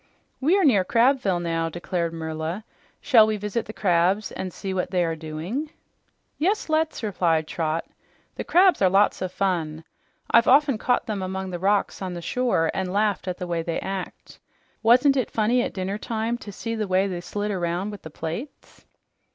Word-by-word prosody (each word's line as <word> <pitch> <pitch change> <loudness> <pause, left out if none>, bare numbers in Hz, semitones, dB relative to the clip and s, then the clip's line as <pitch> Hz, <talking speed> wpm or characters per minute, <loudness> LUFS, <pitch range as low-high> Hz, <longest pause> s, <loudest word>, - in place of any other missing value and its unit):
"We 320 +9 +3
are 390 - +2
near 220 - +5
Crabville 230 -3 +2
now," 165 -1 -1
declared 170 0 -3
Merla. 160 +4 -4 0.4
"Shall 225 -6 +6
we 215 -1 0
visit 210 +3 -3
the - - -5
crabs 185 +1 +1
and 185 - -5
see 190 +2 -5
what 180 -1 -1
they 180 -1 +1
are 165 -1 -1
doing?" 165 - -5 0.7
"Yes, 380 +3 0
let's," 315 -4 0
replied 170 -6 +1
Trot. 160 0 -2 0.5
"The - - -5
crabs 365 - +4
are 190 - +5
lots 195 +2 +3
of 185 -1 -2
fun. 165 -5 -1 0.5
I've 230 0 +5
often 275 -3 +4
caught 245 +1 +1
them 210 -3 -3
among 190 0 -4
the 175 - -4
rocks 200 +2 +1
on 185 -2 -4
the - - -5
shore 200 -5 +1
and 190 -1 -2
laughed 205 -1 0
at 180 - -2
the 180 - -4
way 170 -1 -1
they 165 0 -2
act. 195 -1 -6 0.4
Wasn't 250 +5 +5
it 255 - 0
funny 230 +3 +2
at - - -2
dinnertime 220 +4 -3
to 205 - -9
see 230 +4 -5
the 220 -2 -2
way 190 +1 +2
they 180 -3 -4
slid 205 +4 -3
around 180 +2 -2
with 205 - -9
the 160 - -9
plates?" 165 - -7
195 Hz, 185 wpm, -24 LUFS, 175-230 Hz, 0.7 s, Shall